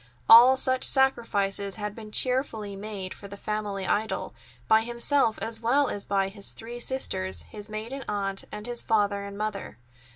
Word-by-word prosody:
All 245 +3 +9
such 260 0 +2
sacrifices 205 -7 +1
had 210 -1 -4
been 215 -1 -10
cheerfully 225 -5 +1
made 195 -2 -6
for 200 - -11
the 200 0 -10
family 205 -2 -3
idol, 220 +2 -1 0.3
by 220 0 +5
himself 235 +1 +1
as 225 0 -4
well 265 +4 +2
as 200 - -3
by 195 -1 0
his 200 0 -4
three 235 +2 -8
sisters, 95 - -2
his 205 - -9
maiden 230 +6 -6
aunt, 195 -1 -2
and 210 0 -7
his 240 -1 -4
father 205 -2 +1
and 200 0 -8
mother. 205 - -4
215 Hz, 165 wpm, -27 LUFS, 200-235 Hz, 0.3 s, All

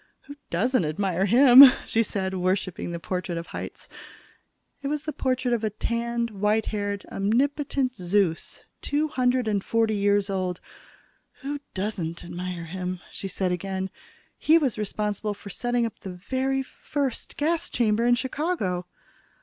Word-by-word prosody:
"Who 285 - -11
doesn't 245 +6 +1
admire 180 +4 0
him?" 250 +4 +10 0.2
she 225 - +1
said, 190 -4 -2
worshiping 185 -1 -1
the 170 - -4
portrait 180 0 -3
of 170 +1 -6
Hitz. - - -7 0.9
It 280 - -3
was 295 +1 -2
the 310 - -4
portrait 255 -1 0
of 230 -2 0
a 215 - +1
tanned, 235 +2 -2
white 210 +2 +1
haired, 205 -1 -3
omnipotent 260 +4 0
Zeus, 180 -2 0 0.2
two 300 +2 0
hundred 250 -3 +1
and 205 -2 0
forty 225 -1 +1
years 200 0 +2
old. 185 -3 -2 0.8
"Who 290 +1 -3 0.2
doesn't 185 -5 -3
admire 175 -1 -5
him?" 180 +1 -4
she 195 - -5
said 185 -1 -1
again. 190 +1 -3 0.5
"He 320 +2 +5
was 275 -8 +1
responsible 210 0 -2
for 200 0 -10
setting 245 +3 0
up 225 - -6
the 195 - -7
very 265 +8 -1
first 270 -1 -4
gas 325 +3 0
chamber 220 -1 +1
in 240 0 +5
Chicago." 255 - -2
210 Hz, 150 wpm, -26 LUFS, 190-255 Hz, 0.9 s, him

